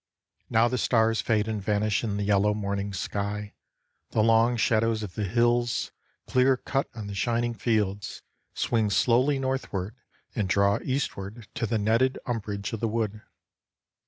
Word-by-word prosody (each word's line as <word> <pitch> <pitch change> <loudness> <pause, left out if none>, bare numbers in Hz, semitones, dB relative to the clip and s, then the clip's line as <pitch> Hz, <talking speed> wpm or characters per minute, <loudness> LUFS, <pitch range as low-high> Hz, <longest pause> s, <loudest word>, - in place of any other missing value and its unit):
Now 115 +1 +4
the 125 +1 -1
stars 115 -1 +2
fade 110 -2 +1
and 110 -2 -2
vanish 105 +1 0
in 105 -3 -1
the 100 - -1
yellow 105 +1 +2
morning 100 -1 -2
sky, 100 +2 -3 0.6
the 110 - +2
long 115 +2 +4
shadows 110 0 +2
of 95 -4 -6
the 105 - -2
hills, 120 +3 +1 0.3
clear 130 +1 +3
cut 135 +1 -2
on 110 -3 -6
the 100 - -6
shining 120 +3 0
fields, 105 -4 -1 0.3
swing 110 -3 +1
slowly 125 +7 +3
northward 130 -7 -2 0.4
and 100 -3 -1
draw 100 +1 +3
eastward 110 -5 -3
to 125 -3 -2
the 115 +1 0
netted 115 +5 +2
umbrage 100 -4 -3
of 115 - -3
the 115 - 0
wood. 110 -1 -2
110 Hz, 155 wpm, -27 LUFS, 100-120 Hz, 0.6 s, Now